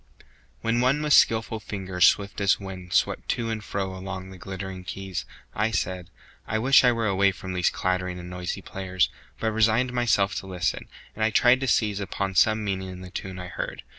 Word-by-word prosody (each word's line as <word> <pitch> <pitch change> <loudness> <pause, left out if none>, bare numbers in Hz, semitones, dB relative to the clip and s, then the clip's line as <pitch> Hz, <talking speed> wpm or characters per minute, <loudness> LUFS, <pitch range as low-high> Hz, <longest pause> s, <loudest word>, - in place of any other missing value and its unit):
WHEN 115 +1 +1
one 130 +3 +3
with 150 -1 +3
skillful 110 0 +4
fingers 95 -4 +1
swift 100 0 +1
as 100 0 +3
wind 95 -2 -8
Swept 90 - +1
to 115 -1 -1
and 110 -1 -4
fro 95 -2 -3
along 95 0 -6
the 95 - -10
glittering 95 0 -6
keys, 95 -7 -5 0.3
I 105 +2 +1
said: 90 -3 -2 0.4
I 110 - 0
wish 130 +5 +5
I 125 - +6
were 115 -1 -1
away 100 -1 +3
from 95 0 -7
these 90 -1 +2
Clattering 90 -1 -1
and 90 0 -8
noisy 90 0 -5
players! 95 -2 -1 0.3
but 110 - 0
resigned 110 +3 +2
Myself 115 -5 +2
to 95 - -5
listen, 90 -3 -2 0.3
and 110 - -3
I 110 - +4
tried 120 +3 +5
to 135 - -2
seize 105 -5 +2
Upon 100 -1 -3
some 110 +3 +3
meaning 95 -2 -2
in 90 0 -8
the 90 -1 -10
tune 95 0 -6
I 90 -1 -7
heard. - - -5
95 Hz, 200 wpm, -26 LUFS, 95-110 Hz, 0.4 s, I